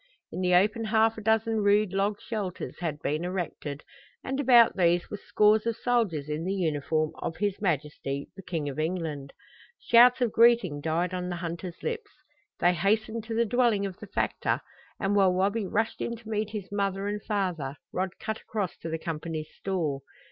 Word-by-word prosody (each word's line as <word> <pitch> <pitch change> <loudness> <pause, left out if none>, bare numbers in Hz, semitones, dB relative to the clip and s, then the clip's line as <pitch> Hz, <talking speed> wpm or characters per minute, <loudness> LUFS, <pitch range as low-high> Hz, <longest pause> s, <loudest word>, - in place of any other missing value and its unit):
In - - -4
the 180 -1 +3
open 215 +5 +3
half 220 0 +3
a - - -8
dozen 225 +1 +2
rude 205 -1 +3
log 200 +1 0
shelters 205 -6 -5
had 155 -4 -4
been 155 +3 -1
erected, 175 -5 -4 0.4
and 265 +1 -3
about 240 -4 +6
these 175 -1 +2
were 210 - -3
scores 215 +2 +3
of 230 - 0
soldiers 215 - 0
in 150 +2 -3
the 190 +3 -1
uniform 155 -2 0
of 165 - -4
his 205 -2 -1
Majesty, 150 -5 -2
the 195 - -9
King 165 -5 -3
of 140 +1 -4
England. 155 -4 -3 0.5
Shouts 240 +2 +6
of 245 -3 +1
greeting 230 -11 +4
died 165 +4 0
on 180 0 -3
the 175 - -2
hunters' 170 +1 -6
lips. 450 -3 -3 0.5
They 175 +1 +4
hastened 215 +5 0
to 225 -1 -4
the 235 +1 +3
dwelling 230 -3 +2
of 190 -2 -6
the - - -9
factor, - - -1 0.4
and 195 +1 0
while 190 -2 +5
Wabi 200 +3 0
rushed 225 +4 -1
in 235 - -2
to 225 -1 -12
meet 215 -1 -1
his 205 -3 -6
mother 200 -1 -1
and 205 0 -3
father 180 -11 -2 0.2
Rod 185 0 -2
cut 220 0 -4
across 205 -5 -3
to 165 - -6
the 160 - -2
Company's 160 -1 -5
store. 160 -8 -2
195 Hz, 185 wpm, -28 LUFS, 165-220 Hz, 0.5 s, about